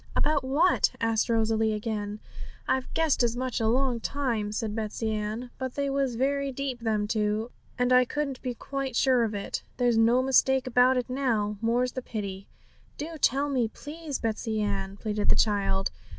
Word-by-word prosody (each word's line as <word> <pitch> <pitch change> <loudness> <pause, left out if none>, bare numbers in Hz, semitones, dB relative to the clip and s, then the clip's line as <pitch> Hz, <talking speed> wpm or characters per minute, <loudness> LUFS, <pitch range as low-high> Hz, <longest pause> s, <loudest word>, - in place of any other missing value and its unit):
'About 295 -2 +2
what?' 295 +7 +3
asked 225 0 +1
Rosalie 225 -1 +2
again. 210 -1 -3 0.5
'I've 260 -1 0
guessed 320 -5 +2
as 240 0 +1
much 255 0 -2
a 225 - +1
long 250 +1 +1
time,' 230 -6 -2
said 215 0 -2
Betsey 220 0 -2
Ann; 215 +3 -3
'but 260 -1 -4
they 280 -1 -1
was 270 -3 0
very 275 +2 0
deep, 265 -1 -4
them 215 -3 0
two, 215 +1 -1 0.3
and 250 0 +2
I 250 0 +7
couldn't 275 0 -3
be 250 -2 -3
quite 275 0 -4
sure 255 -2 +4
of 220 -2 -2
it. 200 - -3 0.2
There's 240 -2 +3
no 235 +3 +4
mistake 265 0 +3
about 255 +1 +4
it 250 - -1
now, 230 -6 0
more's 240 +2 +1
the 255 - -4
pity!' 200 -5 -5 0.5
'Do 320 +2 -5
tell 275 +3 +3
me, 255 -5 +1
please, 295 +4 -6
Betsey 220 -1 -2
Ann!' 200 -1 -2
pleaded 210 -1 -1
the - - +6
child. 195 -2 +1
240 Hz, 180 wpm, -27 LUFS, 215-265 Hz, 0.5 s, I